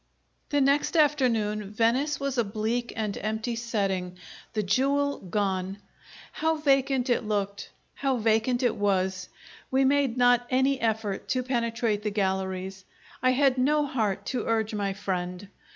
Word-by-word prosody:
The 290 -1 +2
next 280 +4 +2
afternoon 230 -9 +2
Venice 245 +7 +1
was 275 -2 -2
a - - +4
bleak 220 +3 -2
and 215 -3 -2
empty 220 +3 -2
setting, 195 -6 -2 0.4
the 215 - 0
jewel 280 +7 +1
gone. 190 0 -2 0.5
How 320 0 0
vacant 275 -3 +2
it 240 - +1
looked, 200 -2 -2 0.2
how 270 -2 0
vacant 225 +3 +1
it 240 -3 +2
was! 190 -2 0 0.4
We 265 +1 +3
made 275 -3 +2
not 245 0 +4
any 265 +1 +2
effort 220 -3 -1
to 255 -1 0
penetrate 235 -4 -1
the 210 - -1
galleries; 190 -1 -2 0.4
I 255 - +4
had 265 -1 +3
no 295 +3 +3
heart 210 -7 -1
to 245 - -2
urge 220 -1 0
my 200 -2 -1
friend. 185 -1 -4
225 Hz, 145 wpm, -27 LUFS, 200-265 Hz, 0.5 s, a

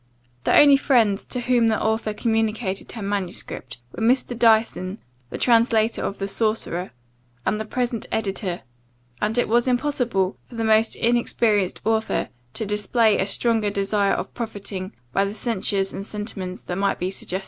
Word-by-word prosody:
* 120 0 -38
The - - +4
only 285 -1 +8
friends 230 -8 +2
to 250 - -4
whom 240 -1 +3
the 220 -1 +2
author 220 0 0
communicated 220 -2 -1
her 225 - -6
manuscript, 185 -9 -4
were - - -8
Mr. 245 +1 +2
Dyson, 220 -4 +2 0.3
the - - -5
translator 230 -2 +3
of 200 - -3
the 195 - -3
Sorcerer, 205 -4 -1 0.6
and 210 - 0
the 220 - -3
present 240 0 -2
editor; 195 -4 -2 0.6
and 215 +3 0
it 245 - +2
was 235 +3 +2
impossible 245 -7 0
for 240 - -12
the 230 - -2
most 220 0 +4
inexperienced 230 -4 +1
author 220 0 0 0.3
to 220 - -2
display 210 +2 +2
a 190 - +1
stronger 220 0 +1
desire 200 0 +1
of - - -3
profiting 200 -4 -5 0.2
by 195 - +3
the 200 +1 -3
censures 200 -4 0
and 195 - -5
sentiments 200 -3 -5
that 175 +1 -4
might 200 0 +1
be 180 +1 -2
suggested. 190 -1 -4
215 Hz, 165 wpm, -23 LUFS, 195-230 Hz, 0.6 s, only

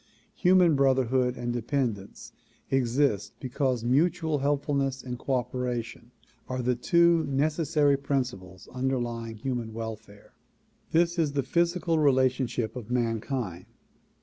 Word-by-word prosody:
Human 180 -3 +5
brotherhood 130 -2 +2
and 120 0 -3
dependence 120 -4 -3 0.4
exist 130 -3 +1
because 130 -2 -1
mutual 160 +4 +1
helpfulness 140 -1 0
and 125 -1 -6
cooperation 125 -3 -3 0.4
are 130 -1 -2
the 125 +1 +2
two 170 +6 +3
nec 140 +3 +1
essary 150 -3 +1
principles 120 -10 -3
underlying 120 -3 -2
human 120 -1 -4
welfare. 110 -2 -8 0.6
This 170 +1 +2
is 150 -3 +1
the 140 -1 0
physical 170 +2 +1
relationship 130 -5 +1
of 120 -3 -7
mankind. 115 -5 -2
130 Hz, 110 wpm, -27 LUFS, 120-145 Hz, 0.6 s, Human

